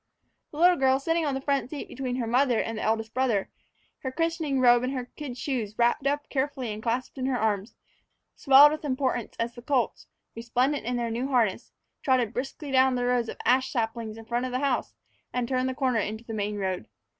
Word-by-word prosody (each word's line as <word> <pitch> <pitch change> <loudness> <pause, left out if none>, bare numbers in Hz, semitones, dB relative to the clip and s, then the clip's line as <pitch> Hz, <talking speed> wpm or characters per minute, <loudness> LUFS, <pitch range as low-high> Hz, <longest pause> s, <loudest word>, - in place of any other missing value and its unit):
The 295 - -11
little 355 +2 +5
girl, 265 -1 +3
sitting 330 +2 0
on 280 - 0
the 270 - -3
front 275 -2 0
seat 295 -1 -6
between 255 -1 -4
her 250 -2 -2
mother 245 +1 +2
and 225 - -2
the 215 - -4
eldest 220 0 -1
brother, 240 -6 0 0.5
her 260 - -4
christening 325 -2 -1
robe 245 -1 +6
and 260 +2 -2
the 250 - -3
kid 275 -5 -6
shoes 230 -8 -3
wrapped 240 +4 +2
up 290 +1 -1
carefully 265 -4 -2
and 210 - -7
clasped 245 +4 -2
in 260 - -1
her 260 -2 0
arms, 210 -2 -1 0.6
swelled 280 +1 +7
with 310 +1 -4
importance 260 -4 -1
as 235 +1 -2
the 240 - -11
colts, 250 -2 -1 0.3
resplendent 245 +4 0
in 250 - 0
their 235 -1 -2
new 240 +4 -2
harness, 235 -5 0 0.3
trotted 250 -4 +2
briskly 275 +3 -5
down 260 -1 +4
the 245 0 -1
rows 245 -2 +1
of - - -6
ash 255 +2 +3
saplings 225 -2 -3
in 225 - -10
front 240 +2 -1
of - - -6
the 250 - 0
house 275 -1 -1 0.4
and 250 -1 -1
turned 255 0 0
the 260 - -4
corner 255 -4 +1
into 220 +2 -3
the 230 - -7
main 210 -1 -2
road. 185 - -3
250 Hz, 215 wpm, -27 LUFS, 230-270 Hz, 0.6 s, swelled